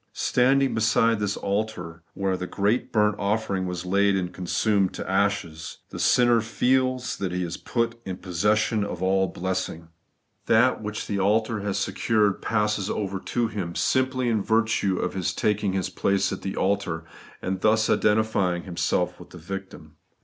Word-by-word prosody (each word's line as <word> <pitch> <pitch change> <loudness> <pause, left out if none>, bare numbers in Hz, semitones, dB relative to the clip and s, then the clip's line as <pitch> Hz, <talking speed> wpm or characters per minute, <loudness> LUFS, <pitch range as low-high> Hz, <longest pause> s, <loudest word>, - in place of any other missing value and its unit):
Standing 135 +2 +2
beside 115 0 +2
this 105 -1 -1
altar 100 -5 -3
where 95 -1 0
the 90 0 -5
great 105 +7 0
burnt 105 -2 +3
offering 100 -2 -1
was 90 0 -4
laid 100 +2 +3
and 90 -2 -2
consumed 95 +2 0
to - - -6
ashes, 95 -5 -1
the - - -7
sinner 120 -2 +4
feels 130 +3 0
that 95 -2 -3
he 90 0 -1
is 85 -1 -4
put 115 -1 -2
in 95 -3 -5
possession 105 +4 +1
of 90 -3 -4
all 95 0 +2
blessing. 90 -2 -4 0.6
That - - +4
which 105 0 -4
the 100 - -2
altar 110 +3 +1
has 100 -1 -2
secured 105 -3 +1
passes 105 -2 0
over 100 -2 -2
to 120 +4 -1
him 95 -6 -5
simply 130 -1 +1
in 110 -3 +1
virtue 110 -3 +1
of - - -2
his 90 -1 -2
taking 105 -2 0
his 95 -2 -2
place 100 -1 +1
at - - -6
the 95 - -4
altar, 95 -4 -1 0.4
and 95 0 -3
thus 110 +1 +3
identifying 105 -5 +2
himself 85 0 -1
with - - -12
the - - -12
victim. 85 -3 -8
100 Hz, 165 wpm, -25 LUFS, 95-110 Hz, 0.6 s, sinner